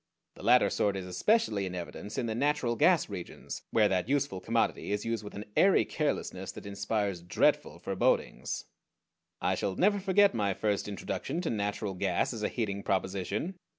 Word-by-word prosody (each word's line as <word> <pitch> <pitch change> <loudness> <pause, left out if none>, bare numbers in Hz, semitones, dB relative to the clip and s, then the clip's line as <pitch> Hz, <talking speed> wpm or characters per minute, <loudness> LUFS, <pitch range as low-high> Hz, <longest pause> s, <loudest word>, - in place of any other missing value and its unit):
The - - -14
latter - - +5
sort 100 -2 +1
is 95 - -5
especially 100 - +1
in 90 - -5
evidence 90 +3 -6
in 125 - 0
the 110 - -1
natural 135 -1 +1
gas 165 +5 +4
regions, 95 -4 -7
where 110 -2 +4
that 95 +2 0
useful 140 -9 0
commodity 115 +1 0
is 105 0 -1
used 115 -2 -2
with 105 - -9
an 105 - -6
airy 195 0 +5
carelessness 120 - -2
that - - -10
inspires 100 -2 -2
dreadful 90 +1 +1
forebodings. - - 0 0.8
I - - +2
shall 95 - -2
never 205 +2 +3
forget 200 +1 +4
my 100 -4 0
first 105 -2 0
introduction 100 - -3
to 170 - -1
natural 105 -1 -2
gas 90 - 0
as - - -5
a - - 0
heating 100 -4 -2
proposition. 100 - -2
105 Hz, 175 wpm, -30 LUFS, 95-140 Hz, 0.8 s, latter